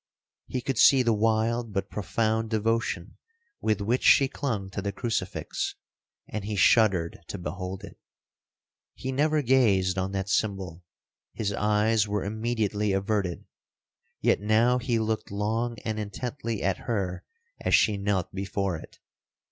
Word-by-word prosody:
He 130 Hz, -, -3 dB
could 130 Hz, -2 st, -2 dB
see 135 Hz, +1 st, +7 dB
the 115 Hz, -2 st, +3 dB
wild 110 Hz, +1 st, +1 dB
but 95 Hz, -, -2 dB
profound 110 Hz, +3 st, 0 dB
devotion 110 Hz, -4 st, -1 dB, 0.4 s
with 110 Hz, -2 st, 0 dB
which 120 Hz, +5 st, +1 dB
she 135 Hz, -, +6 dB
clung 115 Hz, -8 st, -3 dB
to 100 Hz, -, -4 dB
the 100 Hz, +1 st, -2 dB
crucifix,—and 105 Hz, -1 st, -5 dB
he 105 Hz, +1 st, -3 dB
shuddered 95 Hz, -5 st, +3 dB
to -, -, -5 dB
behold 95 Hz, +3 st, -5 dB
it. -, -, -11 dB, 1.0 s
He 130 Hz, -, -4 dB
never 150 Hz, +2 st, +2 dB
gazed 100 Hz, -8 st, +3 dB
on 95 Hz, +1 st, -2 dB
that 95 Hz, -1 st, -2 dB
symbol,—his 95 Hz, +1 st, -4 dB
eyes 105 Hz, +1 st, +2 dB
were 105 Hz, -1 st, -1 dB
immediately 105 Hz, -1 st, -1 dB
averted;—yet 95 Hz, -2 st, -3 dB
now 115 Hz, +4 st, +3 dB
he 120 Hz, -2 st, 0 dB
looked 110 Hz, 0 st, -1 dB
long 110 Hz, +4 st, -1 dB
and 110 Hz, -1 st, -2 dB
intently 115 Hz, +2 st, -4 dB
at 95 Hz, -2 st, +1 dB
her 95 Hz, -5 st, -1 dB, 0.4 s
as -, -, +4 dB
she 105 Hz, -, +4 dB
knelt 100 Hz, -3 st, -1 dB
before 95 Hz, -2 st, -2 dB
it. -, -, -13 dB
105 Hz, 130 wpm, -27 LUFS, 100-115 Hz, 1.0 s, see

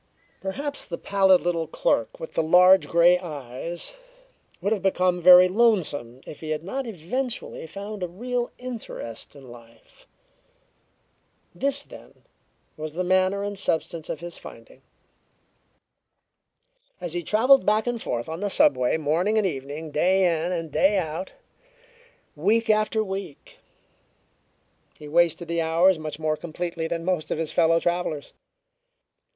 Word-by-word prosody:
Perhaps 280 Hz, +10 st, -3 dB
the 170 Hz, -, -5 dB
pallid 190 Hz, -2 st, +3 dB
little 170 Hz, -2 st, -1 dB
clerk 115 Hz, -7 st, -1 dB
with 160 Hz, -, -8 dB
the -, -, +1 dB
large 180 Hz, +4 st, +6 dB
grey 175 Hz, +1 st, +5 dB
eyes 155 Hz, -, -4 dB, 0.7 s
would 200 Hz, -, 0 dB
have 205 Hz, -, -3 dB
become 180 Hz, -2 st, +1 dB
very 180 Hz, +1 st, +9 dB
lonesome 180 Hz, -, +1 dB
if -, -, -10 dB
he 155 Hz, -, -7 dB
had 155 Hz, 0 st, -2 dB
not 260 Hz, +8 st, -4 dB
eventually 225 Hz, +1 st, -4 dB
found 200 Hz, +3 st, -7 dB
a 180 Hz, -, -1 dB
real 240 Hz, +7 st, -3 dB
interest 230 Hz, -, -7 dB
in 135 Hz, -3 st, -13 dB
life. 115 Hz, -1 st, -18 dB, 1.5 s
This, 280 Hz, +1 st, -1 dB
then, -, -, -15 dB, 0.5 s
was 155 Hz, 0 st, -6 dB
the 180 Hz, +3 st, -2 dB
manner 185 Hz, +2 st, +2 dB
and 205 Hz, -1 st, -4 dB
substance 165 Hz, -2 st, -2 dB
of 155 Hz, -, -4 dB
his 175 Hz, 0 st, -7 dB
finding. -, -, -13 dB, 2.2 s
As 175 Hz, -3 st, -5 dB
he 175 Hz, -, -2 dB
traveled 230 Hz, -, +4 dB
back 215 Hz, +2 st, +2 dB
and 240 Hz, -2 st, -2 dB
forth 120 Hz, -1 st, -3 dB
on 160 Hz, +1 st, -5 dB
the 205 Hz, +1 st, -2 dB
subway 130 Hz, -7 st, +3 dB
morning 165 Hz, +8 st, 0 dB
and 215 Hz, -, +2 dB
evening, 150 Hz, -1 st, -5 dB
day 185 Hz, +6 st, +2 dB
in 170 Hz, -1 st, +1 dB
and 165 Hz, -3 st, -3 dB
day 195 Hz, +7 st, +3 dB
out, 165 Hz, +1 st, -4 dB, 1.0 s
week 215 Hz, +8 st, +2 dB
after 215 Hz, +1 st, +1 dB
week, 195 Hz, -6 st, -7 dB, 1.4 s
he 150 Hz, -, -11 dB
wasted 170 Hz, +2 st, +2 dB
the 170 Hz, 0 st, -1 dB
hours 165 Hz, +2 st, +3 dB
much 155 Hz, -1 st, -6 dB
more 155 Hz, 0 st, -1 dB
completely 170 Hz, 0 st, -4 dB
than 165 Hz, 0 st, -4 dB
most 180 Hz, -4 st, -1 dB
of -, -, -1 dB
his 160 Hz, -1 st, -3 dB
fellow 165 Hz, 0 st, +3 dB
travelers. 175 Hz, -4 st, -2 dB
175 Hz, 140 wpm, -25 LUFS, 160-200 Hz, 2.2 s, very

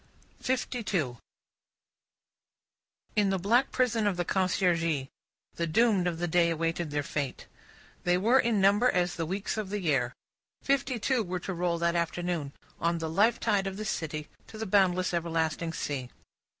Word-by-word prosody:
Fifty 255 Hz, -1 st, -1 dB
two 155 Hz, -, -1 dB, 2.0 s
In 205 Hz, -2 st, +3 dB
the 195 Hz, -, +1 dB
black 230 Hz, +8 st, +3 dB
prison 235 Hz, -4 st, +1 dB
of 190 Hz, -3 st, 0 dB
the 175 Hz, -, -1 dB
Conciergerie, 165 Hz, -7 st, +1 dB, 0.5 s
the 170 Hz, -, 0 dB
doomed 200 Hz, +1 st, +3 dB
of 170 Hz, -2 st, -1 dB
the 175 Hz, +1 st, -1 dB
day 170 Hz, 0 st, +3 dB
awaited 165 Hz, 0 st, -1 dB
their 145 Hz, 0 st, -1 dB
fate. 140 Hz, -2 st, -4 dB, 0.6 s
They 175 Hz, 0 st, +3 dB
were 230 Hz, +8 st, +4 dB
in 230 Hz, -4 st, +2 dB
number 205 Hz, +6 st, +4 dB
as 180 Hz, -3 st, +1 dB
the 165 Hz, -2 st, -3 dB
weeks 195 Hz, +5 st, -3 dB
of 210 Hz, -3 st, -3 dB
the 205 Hz, +1 st, -2 dB
year. 135 Hz, -9 st, 0 dB, 0.5 s
Fifty 275 Hz, -2 st, +1 dB
two 245 Hz, +3 st, +1 dB
were 180 Hz, -3 st, -3 dB
to 190 Hz, -, -4 dB
roll 175 Hz, -1 st, 0 dB
that 170 Hz, 0 st, +1 dB
afternoon 170 Hz, -3 st, -1 dB, 0.3 s
on 170 Hz, 0 st, +1 dB
the 160 Hz, -1 st, -3 dB
life 215 Hz, +7 st, +3 dB
tide 200 Hz, -3 st, +1 dB
of 190 Hz, 0 st, -5 dB
the 215 Hz, -, -4 dB
city 155 Hz, -6 st, -3 dB, 0.2 s
to 220 Hz, -, -10 dB
the 220 Hz, -, -3 dB
boundless 185 Hz, -2 st, +2 dB
everlasting 165 Hz, -1 st, -1 dB
sea. 140 Hz, -5 st, -4 dB
180 Hz, 165 wpm, -29 LUFS, 165-210 Hz, 2.0 s, were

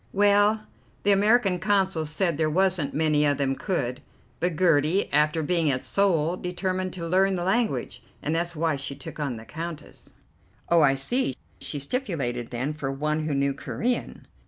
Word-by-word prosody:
"Well, 205 Hz, +2 st, +3 dB, 0.4 s
the 205 Hz, -, +4 dB
American 200 Hz, -2 st, +3 dB
Consul 190 Hz, -5 st, +1 dB
said 170 Hz, +2 st, 0 dB
there 155 Hz, +1 st, +1 dB
wasn't 180 Hz, -2 st, +1 dB
many 150 Hz, -1 st, +2 dB
of 145 Hz, -2 st, +2 dB
them 135 Hz, -1 st, 0 dB
could; 135 Hz, -11 st, -2 dB, 0.4 s
but 175 Hz, 0 st, 0 dB
Gertie, 165 Hz, +1 st, +3 dB
after 150 Hz, +2 st, +2 dB
being 165 Hz, -1 st, +1 dB
at 130 Hz, -2 st, -1 dB
Seoul, 180 Hz, -4 st, +1 dB
determined 185 Hz, +1 st, -2 dB
to 170 Hz, -2 st, -5 dB
learn 190 Hz, +2 st, +3 dB
the 175 Hz, -, -2 dB
language, 190 Hz, -, -1 dB, 0.2 s
and 150 Hz, -, -1 dB
that's 170 Hz, +1 st, -1 dB
why 160 Hz, -2 st, 0 dB
she 140 Hz, 0 st, -5 dB
took 140 Hz, -, -9 dB
on 140 Hz, -5 st, -2 dB
the 110 Hz, 0 st, -10 dB
Countess." 165 Hz, +1 st, -8 dB, 0.6 s
"Oh, 170 Hz, -1 st, +5 dB
I 135 Hz, -2 st, +4 dB
see. 135 Hz, -, +2 dB, 0.2 s
She 150 Hz, -, -3 dB
stipulated, 140 Hz, -, -3 dB
then, 125 Hz, +5 st, -3 dB
for 140 Hz, -3 st, -4 dB
one 150 Hz, +3 st, -1 dB
who 145 Hz, -, -1 dB
knew 140 Hz, 0 st, +1 dB
Corean?" 240 Hz, -, -3 dB
165 Hz, 170 wpm, -26 LUFS, 145-190 Hz, 0.6 s, Oh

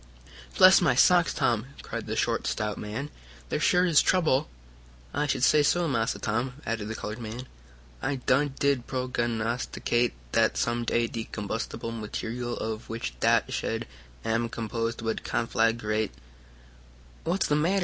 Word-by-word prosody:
"Bless 185 Hz, +1 st, +8 dB
my 135 Hz, -8 st, +3 dB
socks, 175 Hz, +5 st, +5 dB
Tom!" 120 Hz, -4 st, 0 dB, 0.2 s
cried -, -, -5 dB
the -, -, -2 dB
short, -, -, 0 dB
stout 105 Hz, -1 st, -2 dB
man. 120 Hz, +8 st, -5 dB, 0.4 s
"There -, -, -1 dB
sure 180 Hz, 0 st, +4 dB
is 165 Hz, -5 st, +5 dB
trouble!" 160 Hz, -, +2 dB, 0.6 s
"I 150 Hz, -, 0 dB
should 130 Hz, -, 0 dB
say 150 Hz, +3 st, +6 dB
So, 170 Hz, +4 st, +2 dB
Massa 115 Hz, -4 st, 0 dB
Tom!" 120 Hz, +4 st, -2 dB
added 115 Hz, -2 st, -2 dB
the 110 Hz, -, -4 dB
colored 105 Hz, +2 st, -5 dB
man. 115 Hz, +2 st, -6 dB, 0.6 s
"I 145 Hz, -, 0 dB
done 135 Hz, +2 st, +1 dB
did 140 Hz, -4 st, +1 dB
prognosticate 120 Hz, -1 st, -1 dB, 0.2 s
dat -, -, +2 dB
some 120 Hz, 0 st, 0 dB
day 115 Hz, 0 st, +2 dB
de 115 Hz, -1 st, -4 dB
combustible 110 Hz, +2 st, -4 dB
material 115 Hz, +2 st, -4 dB
of 110 Hz, +1 st, -4 dB
which 115 Hz, -, -4 dB
dat -, -, +3 dB
shed -, -, -2 dB, 0.4 s
am 115 Hz, +1 st, 0 dB
composed 115 Hz, 0 st, -3 dB
would 110 Hz, 0 st, -2 dB
conflaggrate 115 Hz, -2 st, 0 dB, 0.6 s
" -, -, -25 dB
"What's 180 Hz, +4 st, +1 dB
the 150 Hz, -, +2 dB
matter?" 170 Hz, +6 st, +2 dB
120 Hz, 150 wpm, -27 LUFS, 110-135 Hz, 0.6 s, Bless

